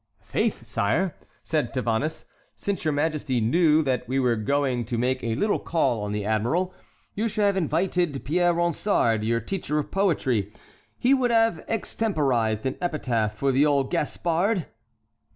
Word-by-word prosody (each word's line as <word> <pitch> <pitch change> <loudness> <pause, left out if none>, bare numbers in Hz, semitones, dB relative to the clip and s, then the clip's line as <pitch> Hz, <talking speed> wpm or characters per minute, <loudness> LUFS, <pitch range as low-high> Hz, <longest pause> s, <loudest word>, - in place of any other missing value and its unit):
"Faith, - - -1
sire," 165 - 0 0.3
said 155 -2 -1
Tavannes, 130 +5 -1 0.3
"since 200 -1 -3
your 155 - +1
Majesty 145 -4 0
knew 155 +7 +3
that 130 -5 -1
we 130 +2 -1
were 125 -3 +2
going 130 +2 0
to 120 +2 -3
make 130 +2 0
a 115 -1 -1
little 210 - +1
call 155 -9 0
on 105 0 -3
the 105 -1 -2
admiral, 120 - 0 0.4
you 220 +3 -1
should 215 -1 -1
have 200 -1 +2
invited 175 -3 0
Pierre 175 +4 +2
Ronsard, 170 - +1
your 115 +1 +1
teacher 150 - -3
of 150 - -2
poetry; 130 - +1 0.5
he 255 +3 +3
would 260 -3 +2
have 225 -7 +2
extemporized 135 - 0
an 130 - -2
epitaph 120 -11 -1
for 135 +5 +1
the 135 +2 +3
old 140 -2 +1
Gaspard." 175 +5 0
145 Hz, 155 wpm, -25 LUFS, 120-180 Hz, 0.5 s, knew